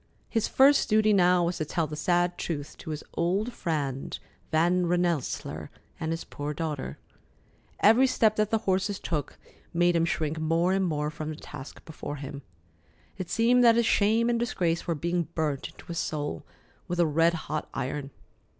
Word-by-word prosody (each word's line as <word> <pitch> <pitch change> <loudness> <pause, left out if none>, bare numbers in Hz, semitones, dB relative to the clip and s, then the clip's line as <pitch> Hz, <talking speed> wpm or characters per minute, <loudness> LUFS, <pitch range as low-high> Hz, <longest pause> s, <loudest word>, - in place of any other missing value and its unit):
His 225 -2 0
first 275 +2 +5
duty 215 0 +4
now 180 -2 +4
was 175 +1 -1
to 155 - -2
tell 165 +2 -1
the 150 0 -6
sad 175 +2 +1
truth 150 -5 -4
to - - -8
his 155 -1 -4
old 195 +8 0
friend 140 -6 -3 0.3
Van 175 +3 +3
Rensselaer 175 -4 -1 0.3
and 160 - -2
his 165 0 -3
poor 145 +1 -5
daughter. 150 -3 -4 0.8
Every 230 +5 +6
step 220 -4 +3
that 215 -1 +2
the 225 - +2
horses 190 +1 +1
took 150 -5 -3 0.4
made 175 0 +3
him 165 0 +3
shrink 160 -1 -1
more 165 +3 +2
and 190 0 +2
more 150 -2 -1
from 155 -1 -5
the 155 - -4
task 145 -2 -10
before 155 -2 -6
him. 140 0 -7 0.8
It 185 - -4
seemed 245 +2 +4
that 230 -1 +7
his 235 0 +3
shame 220 +3 +3
and 240 -1 +1
disgrace 175 -8 -1
were 170 - +1
being 170 +2 -1
burnt 150 -4 -1
into - - -16
his 170 -2 -4
soul 145 - -3 0.4
with 175 0 -3
a 170 - +5
red 165 +2 +3
hot 155 0 -3
iron. 135 +2 -3
170 Hz, 175 wpm, -28 LUFS, 155-195 Hz, 0.8 s, that